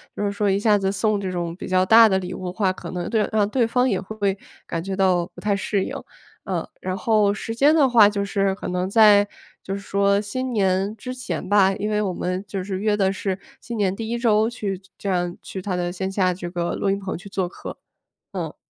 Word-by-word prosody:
就 - - -3
是 200 - 0
说 205 +1 -1
一 195 - +2
下 210 0 +4
子 195 -1 0
送 210 +1 0
这 190 -2 -3
种 170 -2 -3
比 - - -8
较 185 0 +3
大 225 +3 +8
的 190 -2 +2
礼 180 -1 -6
物 185 - -7
的 180 - -4
话， 190 -1 +1
可 185 - -8
能 180 -1 -4
对 220 -3 +1
让 210 -2 +2
对 245 0 +2
方 250 +3 +2
也 - - 0
会 200 -1 -2 0.3
感 165 - -3
觉 195 +1 -3
到 185 -3 +2
不 - - -12
太 205 -1 +1
适 200 0 -1
应， - - -5 0.5
呃。 - - -3
然 185 0 -3
后 205 +1 +2
时 225 +2 -5
间 285 +6 +5
的 295 -4 +4
话 230 -4 +7
就 205 -1 -1
是 195 -1 0
可 190 - -6
能 180 +1 -1
在 205 -1 +6 0.4
就 195 - -4
是 200 - -3
说 200 0 +2
新 255 +5 -4
年 195 0 +1
之 255 +2 -7
前 185 -7 -5
吧， 195 -2 +5
因 205 +2 -3
为 210 0 +1
我 195 -3 -1
们 180 +2 -3
就 190 -1 -4
是 190 0 -4
约 210 +1 +1
的 195 -2 +2
是 195 -1 -3 0.2
新 235 - -7
年 195 -3 0
第 225 +1 -5
1 235 +1 -2
周 220 -2 +3
去 205 -5 -4 0.2
这 200 - -3
样 175 -1 -1
去 190 - -7
他 185 -2 -2
的 175 0 -2
线 190 +1 -3
下 185 -2 +2
这 175 -1 -6
个 175 -1 -2
录 195 - 0
音 200 - -1
棚 190 -1 -4
去 180 - -12
做 190 -2 -2
客。 - - -9 0.5
嗯。 - - -5
200 Hz, 265 characters per minute, -23 LUFS, 185-215 Hz, 0.5 s, 大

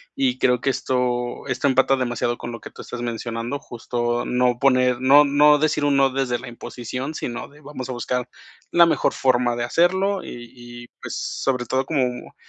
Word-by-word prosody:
Y 270 -2 +1
creo 125 -1 +2
que 135 - 0
esto 125 -2 -1
esto 130 +1 0
empata 135 0 +3
demasiado 120 -2 -1
con 120 - -6
lo 115 - -7
que - - -11
tú - - -11
estás 120 - -7
mencionando, 115 +2 -4
justo 120 0 -3
no 125 -1 +1
poner 125 -2 +3
no 140 +3 +6
no 150 +1 +5
decir 150 -1 +1
un 145 -1 +2
no 135 0 +4
desde 130 -2 -1
la 120 - -9
imposición, 125 +4 -6
sino 120 -4 -5
de 150 +1 -19
vamos 140 -3 -7
a - - -3
buscar 125 +1 -2 0.4
la 170 0 +6
mejor 165 - +1
forma 125 -2 +1
de 120 - -2
hacerlo 190 +8 +1
y 120 - -8
y, 120 -1 -11
pues, - - -6
sobre 125 -2 -2
todo 130 +3 -1
como, 125 -5 -2
125 Hz, 190 wpm, -22 LUFS, 120-140 Hz, 0.4 s, no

